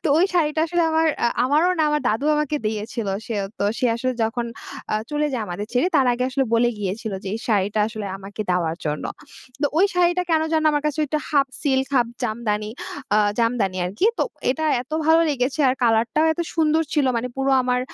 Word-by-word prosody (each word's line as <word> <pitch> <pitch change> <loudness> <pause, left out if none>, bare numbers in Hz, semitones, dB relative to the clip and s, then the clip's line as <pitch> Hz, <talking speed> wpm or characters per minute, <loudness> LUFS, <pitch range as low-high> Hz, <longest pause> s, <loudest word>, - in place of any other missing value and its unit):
তো - - +2
ওই 355 - +5
শাড়িটা 310 -2 +2
আসলে 345 +1 +1
আমার, 320 0 +2 0.2
আ - - +5 0.2
আমারও 300 +7 +3
না, - - +3
আমার 300 - +1
দাদু 220 +6 -1
আমাকে 300 0 0
দিয়েছিল। 215 0 -3 0.2
সে 230 - -3
ও - - -4
তো, - - 0
সে 255 - +2
আসলে 255 +2 -1
যখন 235 +2 -2 0.5
আ - - +2 0.2
চলে 300 0 0
যায় 245 -4 -1
আমাদের 180 +4 -5
ছেড়ে, 250 +7 +2
তার 265 -2 +4
আগে 240 - -2
আসলে 270 +1 +1
বলে 240 +1 +4
গিয়েছিল 205 +2 -3
যে, 195 - -4
এই - - -3
শাড়িটা 205 -1 +1
আসলে 215 -2 -6
আমাকে 200 +2 -9
দেওয়ার 170 -2 0
জন্য। 150 0 -2 0.6
তো - - +4
ওই 390 - +6
শাড়িটা 355 0 +3
কেন 320 -1 +3
যেন 315 -1 +2
আমার 295 -1 0
কাছে 300 0 -2
একটা 305 +2 -1
হাফ 280 -3 +3
সিল্ক, 265 -2 +1
হাফ 240 -2 +3 0.2
জামদানি 215 -2 -2 0.5
আ - - +5 0.2
জামদানি 230 -5 +1
আরকি। 205 - 0
তো - - +3 0.3
এটা 315 +5 -2 0.2
এত 255 - -28 0.2
ভালো 320 +1 +6
লেগেছে, 265 +1 -1
আর 255 - +2
কালার 230 -1 +3
টাও 310 - +3
এত 330 - -5
সুন্দর 320 0 +3
ছিল। 290 -4 +2
মানে 240 +2 -2
পুরো 270 0 0
আমার 250 0 +1
255 Hz, 215 wpm, -22 LUFS, 215-300 Hz, 0.6 s, ওই